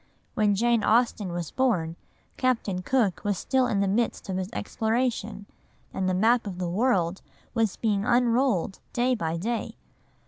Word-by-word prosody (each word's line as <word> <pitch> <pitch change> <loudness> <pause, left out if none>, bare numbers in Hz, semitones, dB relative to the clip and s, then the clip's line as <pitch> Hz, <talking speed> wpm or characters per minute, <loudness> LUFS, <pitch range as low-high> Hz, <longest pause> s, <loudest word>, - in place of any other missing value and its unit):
When 210 -3 +2
Jane 235 +1 +2
Austen 220 -4 +2
was 175 -2 -4
born, 180 -11 0 0.4
Captain 225 -8 0
Cook 220 -3 +1
was 205 -2 0
still 260 +5 +1
in 200 -4 0
the 200 - +2
midst 220 +1 -1
of 185 - -1
his 190 0 -3
exploration, 225 -3 -2 0.5
and 185 -1 -1
the 185 - +1
map 225 +4 +3
of 185 -3 -5
the 180 -1 -2
world 190 -4 +1 0.3
was 225 -4 +1
being 205 -3 0
unrolled 240 -5 +2
day 250 +1 +2
by 165 -8 -2
day. 225 +6 -3
215 Hz, 160 wpm, -26 LUFS, 190-240 Hz, 0.5 s, map